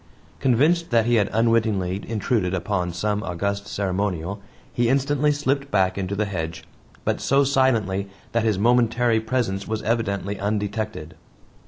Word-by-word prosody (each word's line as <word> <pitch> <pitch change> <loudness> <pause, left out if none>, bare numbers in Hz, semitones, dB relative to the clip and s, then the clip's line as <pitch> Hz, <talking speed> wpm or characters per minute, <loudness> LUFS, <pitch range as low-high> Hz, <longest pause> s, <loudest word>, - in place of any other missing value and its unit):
Convinced 150 +7 +2
that 115 -2 +3
he 120 - +1
had 105 -2 +2
unwittingly 110 -5 +1
intruded 105 -4 0
upon 90 -1 -1
some 105 +4 -1
august 100 +3 -3
ceremonial, 100 -1 -2 0.3
he 120 -1 +1
instantly 140 +2 +2
slipped 140 -1 -1
back 95 -5 +2
into 95 0 -3
the 105 +1 0
hedge, 85 -5 -4 0.4
but - - 0
so 140 +1 +3
silently 115 -8 +1 0.2
that 115 -1 +1
his 110 -3 +1
momentary 120 +1 +3
presence 110 -4 -2
was 110 0 -3
evidently 105 -3 -1
undetected. 105 -4 -3
105 Hz, 140 wpm, -23 LUFS, 100-120 Hz, 0.4 s, that